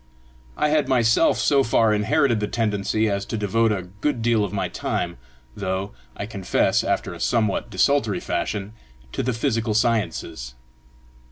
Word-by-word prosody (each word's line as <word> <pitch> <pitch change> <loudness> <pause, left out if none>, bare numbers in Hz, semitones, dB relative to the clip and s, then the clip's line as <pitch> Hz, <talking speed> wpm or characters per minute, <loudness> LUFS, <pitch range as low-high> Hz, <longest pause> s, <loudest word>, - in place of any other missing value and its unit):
I 150 - +2
had 150 0 +2
myself 120 +3 +3
so 140 -2 +3
far 115 -3 +3
inherited 115 +3 +2
the 105 - -1
tendency 110 -1 0
as 100 -1 -1
to 110 - -3
devote 110 +2 +1
a 100 -3 -1
good 105 +7 -3
deal 115 -2 +3
of 100 - -3
my - - -1
time, 85 0 -3 0.4
though, 95 0 -3 0.3
I 100 - -3
confess, 100 -3 +1
after - - -1
a - - -10
somewhat 110 -4 0
desultory 115 -10 +2
fashion, 100 +5 -3 0.4
to - - -2
the 125 - 0
physical 115 -3 -1
sciences. 105 - -1
110 Hz, 155 wpm, -23 LUFS, 100-115 Hz, 0.4 s, myself